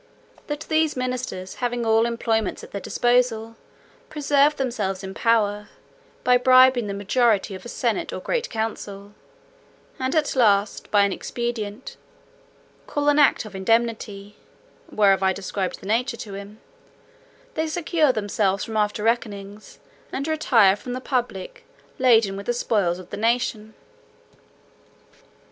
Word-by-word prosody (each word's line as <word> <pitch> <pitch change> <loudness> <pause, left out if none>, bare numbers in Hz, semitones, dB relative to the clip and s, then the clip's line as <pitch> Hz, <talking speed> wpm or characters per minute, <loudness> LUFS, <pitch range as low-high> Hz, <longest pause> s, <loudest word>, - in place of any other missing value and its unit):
That 295 0 -4
these 315 -2 0
ministers, 250 -7 -4
having 245 -1 -1
all 225 +1 +3
employments 225 -2 -1
at - - -11
their 200 - -5
disposal, 240 -2 +1 0.5
preserve 295 0 +2
themselves 210 -8 -2
in 190 0 -6
power, 210 -2 +1 0.5
by 250 0 +5
bribing 255 -2 +5
the 200 - -4
majority 205 0 +1
of 185 +2 -9
a - - -7
senate - - -1
or - - -5
great - - -2
council; 205 -3 -5 0.9
and 260 +2 -1
at 305 -3 +1
last, 205 -4 +2
by 205 -1 +4
an 200 -1 +1
expedient, 235 -1 -5 0.9
called 290 0 0
an 290 +1 +3
act 285 -5 +4
of 210 - -10
indemnity" 210 -1 -1 0.5
(whereof 195 -2 +3
I 190 0 +2
described 190 0 -4
the - - -12
nature 235 +3 0
to 205 -3 -8
him), 200 +2 -9 0.9
"they 320 -6 -1
secure 315 -2 +1
themselves 205 -3 0
from 220 -1 -4
after 210 0 0
reckonings, 210 -3 -3 0.3
and 275 +3 -3
retire 240 -11 +4
from 245 +4 -7
the 255 - -3
public 280 - -3 0.4
laden 225 -6 +4
with 200 +1 -8
the 240 - +1
spoils 200 -7 0
of 185 -1 -12
the 205 - -5
nation. 220 -1 -1
225 Hz, 140 wpm, -23 LUFS, 205-255 Hz, 0.9 s, by